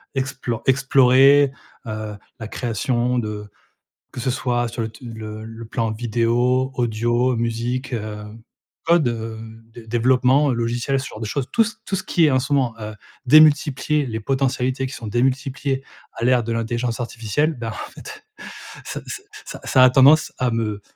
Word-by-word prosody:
explo 130 Hz, -3 st, -3 dB
explorer, 135 Hz, +1 st, +5 dB, 0.4 s
heu, 110 Hz, -1 st, -5 dB, 0.2 s
la 110 Hz, -, -6 dB
création 120 Hz, +2 st, -1 dB
de 105 Hz, -2 st, -5 dB, 0.6 s
que -, -, -9 dB
ce 130 Hz, +1 st, 0 dB
soit 120 Hz, -2 st, -1 dB
sur 115 Hz, +1 st, -4 dB
le 110 Hz, -, -2 dB
te 110 Hz, +3 st, -15 dB
le 110 Hz, -2 st, -7 dB
le 115 Hz, +1 st, -9 dB
plan 115 Hz, 0 st, -2 dB
vidéo, 120 Hz, +3 st, +1 dB
audio, 120 Hz, +1 st, +1 dB
musique, 120 Hz, +3 st, -2 dB
heu, 105 Hz, -2 st, -4 dB, 0.6 s
code, 165 Hz, -6 st, +3 dB
heu, 115 Hz, -1 st, -4 dB, 0.4 s
dé 115 Hz, -2 st, -12 dB
développement, 130 Hz, +4 st, +3 dB
logiciel, 120 Hz, +3 st, -1 dB
ce 130 Hz, -, -6 dB
genre 110 Hz, -, -10 dB
de 110 Hz, -, -3 dB
choses. 130 Hz, +4 st, -2 dB
Tout 230 Hz, -, +4 dB
ce 215 Hz, 0 st, -5 dB
tout 195 Hz, -, -1 dB
ce 190 Hz, -, -3 dB
qui 165 Hz, -3 st, +3 dB
est -, -, +3 dB
en 130 Hz, -, +3 dB
ce 140 Hz, +3 st, -4 dB
moment, 130 Hz, -5 st, +2 dB
heu 105 Hz, 0 st, -6 dB, 0.3 s
démultiplier 150 Hz, 0 st, +4 dB
les 110 Hz, -2 st, -4 dB
potentialités 130 Hz, +1 st, -1 dB
qui 130 Hz, -, -7 dB
sont 115 Hz, -6 st, -7 dB
démultipliées, 135 Hz, +3 st, -1 dB, 0.3 s
à 115 Hz, -, -4 dB
l'ère 125 Hz, -1 st, +3 dB
de 115 Hz, -, -3 dB
l'intelligence 115 Hz, +1 st, -2 dB
artificielle. 120 Hz, +6 st, -1 dB
Ben, 115 Hz, -4 st, -5 dB
en 105 Hz, -, -7 dB
fait, 430 Hz, 0 st, -11 dB, 0.6 s
ça -, -, -5 dB, 0.5 s
ça -, -, -8 dB
ça 130 Hz, -1 st, +5 dB
a 130 Hz, -, +7 dB
tendance 140 Hz, +4 st, +5 dB
à 125 Hz, -1 st, +1 dB
me, 105 Hz, -3 st, -2 dB
125 Hz, 170 wpm, -21 LUFS, 115-135 Hz, 0.6 s, a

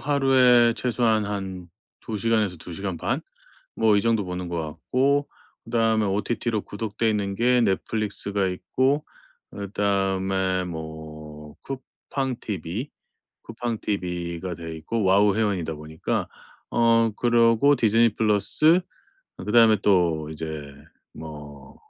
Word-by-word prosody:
하루에 130 Hz, -4 st, +4 dB
최소한 115 Hz, -3 st, +1 dB
한 95 Hz, -3 st, -5 dB, 0.4 s
2 110 Hz, -2 st, -2 dB
시간에서 110 Hz, -5 st, +1 dB
2 85 Hz, +2 st, -10 dB
시간 95 Hz, 0 st, -4 dB
반? -, -, -1 dB, 0.5 s
뭐 110 Hz, -2 st, +3 dB
이 -, -, +3 dB
정도 115 Hz, -2 st, +1 dB
보는 90 Hz, 0 st, -5 dB
것 85 Hz, -1 st, -2 dB
같고 135 Hz, -, 0 dB, 0.4 s
그다음에 115 Hz, -1 st, +1 dB
OTT로 110 Hz, +2 st, -1 dB
구독되어 110 Hz, +1 st, -2 dB
있는 100 Hz, -2 st, -1 dB
게 125 Hz, +3 st, +3 dB
넷플릭스가 100 Hz, -1 st, -1 dB
있고 130 Hz, +10 st, 0 dB, 0.5 s
그다음에 95 Hz, -2 st, 0 dB
뭐 80 Hz, -2 st, -9 dB
쿠팡 135 Hz, -1 st, -5 dB
TV, 100 Hz, -, -4 dB, 0.5 s
쿠팡 115 Hz, -1 st, -4 dB
TV가 90 Hz, -3 st, -3 dB
돼 80 Hz, -1 st, -7 dB
있고 105 Hz, +8 st, -3 dB
와우 100 Hz, +1 st, +4 dB
회원이다 95 Hz, -7 st, 0 dB
보니까 75 Hz, +1 st, -3 dB, 0.4 s
어 115 Hz, -1 st, +3 dB
그러고 120 Hz, +3 st, +4 dB
디즈니 115 Hz, -1 st, +4 dB
플러스 115 Hz, -, +3 dB, 0.6 s
그다음에 110 Hz, 0 st, +5 dB
또 85 Hz, -6 st, +2 dB
이제 80 Hz, -3 st, -6 dB, 0.4 s
뭐 75 Hz, -3 st, -10 dB
105 Hz, 245 characters per minute, -24 LUFS, 90-115 Hz, 0.6 s, 그다음에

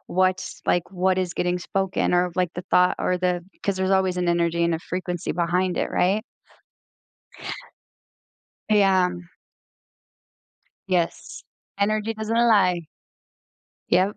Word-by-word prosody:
what's 185 Hz, 0 st, 0 dB
like, 175 Hz, 0 st, +1 dB
what 185 Hz, 0 st, +1 dB
is 180 Hz, -2 st, -2 dB
getting 180 Hz, 0 st, 0 dB
spoken 190 Hz, 0 st, -1 dB
or, 180 Hz, 0 st, +2 dB
like, 180 Hz, -1 st, +2 dB
the 180 Hz, -, -5 dB
thought 180 Hz, 0 st, +4 dB
or 180 Hz, -, 0 dB
the 180 Hz, -1 st, 0 dB, 0.2 s
'cause 200 Hz, -1 st, 0 dB
there's 190 Hz, 0 st, 0 dB
always 190 Hz, -1 st, +2 dB
an 180 Hz, -1 st, 0 dB
energy 170 Hz, 0 st, +1 dB
and 170 Hz, -, +1 dB
a 160 Hz, -, -2 dB
frequency 180 Hz, -1 st, -4 dB
behind 180 Hz, +1 st, 0 dB
it, -, -, -1 dB
right? 195 Hz, +4 st, +1 dB, 2.5 s
Yeah. 195 Hz, -3 st, +4 dB, 1.8 s
Yes. 175 Hz, -3 st, -2 dB, 0.3 s
Energy 215 Hz, +2 st, 0 dB
doesn't 220 Hz, +1 st, -2 dB
lie. 205 Hz, -7 st, +4 dB, 1.1 s
Yep. 190 Hz, +3 st, +3 dB
185 Hz, 125 wpm, -24 LUFS, 175-195 Hz, 2.5 s, thought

